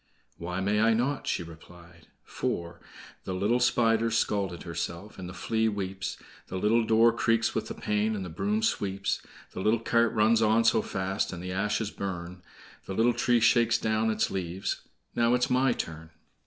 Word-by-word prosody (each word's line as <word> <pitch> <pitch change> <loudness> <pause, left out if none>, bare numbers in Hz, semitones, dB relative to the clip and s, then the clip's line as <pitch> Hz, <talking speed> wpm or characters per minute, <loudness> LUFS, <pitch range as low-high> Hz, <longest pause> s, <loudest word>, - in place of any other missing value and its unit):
"Why 90 +2 -3
may 105 +2 +1
I 115 0 +4
not?" 135 +5 -1
she - - 0
replied; 85 0 -15 0.2
for 85 0 -4 0.4
"The 95 - -4
little 105 +6 +1
Spider's 115 -2 +2
scalt 95 -6 -1
herself, 85 +4 -5
And 90 -1 -6
the - - -7
Flea 110 +4 0
weeps; 95 -2 -4 0.3
The 95 - -5
little 110 +4 +3
door 115 +1 +4
creaks 115 -1 +1
with - - -2
the - - -6
pain, 105 +1 0
And 95 -3 -4
the - - -6
broom 210 - -1
sweeps; 100 - -1 0.3
The - - -7
little 110 +3 +2
cart 115 0 +2
runs 110 +1 +3
on 110 +1 +4
so 115 -1 +4
fast, 95 +1 -2
And 90 -1 -7
the 90 - -4
ashes 105 +2 -1
burn; 90 -2 -6 0.5
The 95 - -4
little 115 +3 +3
tree 120 0 +2
shakes 115 0 +4
down 110 0 0
its 110 0 0
leaves— 95 0 -3 0.3
Now 120 +1 +3
it 125 - 0
is - - 0
my 130 +1 +3
turn!" 80 -7 -5
105 Hz, 180 wpm, -28 LUFS, 95-115 Hz, 0.5 s, I